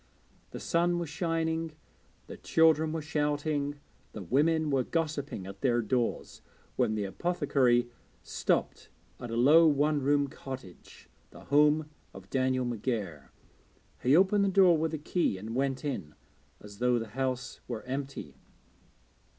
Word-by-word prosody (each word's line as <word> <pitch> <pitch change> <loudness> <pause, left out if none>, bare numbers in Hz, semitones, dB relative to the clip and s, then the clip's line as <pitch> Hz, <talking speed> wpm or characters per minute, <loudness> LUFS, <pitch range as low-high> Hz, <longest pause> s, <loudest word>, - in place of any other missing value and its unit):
The - - -8
sun 175 +1 +1
was 170 -3 -3
shining, 165 0 -2 0.5
the - - -9
children 160 -1 +3
were 160 -1 -3
shouting, 145 -1 -1 0.3
the 105 - -7
women 155 - +1
were 135 -2 +2
gossiping 150 - -3
at 95 +1 -10
their 120 -3 +2
doors, 120 +1 -2 0.3
when 110 - +1
the 105 - -1
apothecary 130 - +1 0.4
stopped - - -1 0.3
at 120 - -7
a 115 - -3
low 150 +8 +6
one 150 0 +2
roomed 140 0 +1
cottage, 130 -9 -10 0.2
the - - -14
home 150 +2 +3 0.3
of 95 0 -12
Daniel 130 -1 +1
McGair. 105 - -3 0.7
He 130 +4 +4
opened 195 +2 +4
the 200 - +2
door 185 -2 +5
with 160 0 -1
a - - -3
key 155 - -1
and 110 +4 -7
went 135 +1 -1
in, 95 - -4 0.4
as 105 0 -13
though 125 0 +2
the 115 -2 -4
house 130 +1 -3
were 115 -3 -5
empty. 135 +2 -6
140 Hz, 140 wpm, -29 LUFS, 120-160 Hz, 0.7 s, low